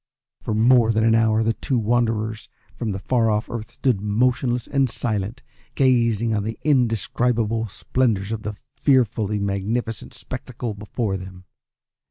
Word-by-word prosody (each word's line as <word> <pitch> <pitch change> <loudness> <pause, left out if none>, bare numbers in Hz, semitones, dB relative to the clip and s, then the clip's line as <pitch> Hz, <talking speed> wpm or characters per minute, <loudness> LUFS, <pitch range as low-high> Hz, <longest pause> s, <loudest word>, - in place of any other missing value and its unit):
For 110 - -2
more 115 +1 +5
than 110 0 +1
an 115 0 +4
hour 110 -1 +3
the 115 +1 +1
two 130 +3 -2
wanderers 110 -1 0 0.3
from 115 - -3
the 95 - -2
far 115 +3 +1
off 105 +2 -1
Earth 115 -1 -5
stood 120 -4 0
motionless 120 +3 +1
and 135 -2 +1
silent, 110 0 -2 0.3
gazing 115 -4 +2
on 105 - 0
the 110 +1 -4
indescribable 115 -4 +1
splendours 105 -1 -1
of 110 -1 -3
the 105 -1 -5 0.2
fearfully 110 -6 +2
magnificent 100 +2 -2
spectacle 125 -3 -5
before 105 0 -3
them. 95 -1 -10
115 Hz, 145 wpm, -23 LUFS, 105-120 Hz, 0.3 s, more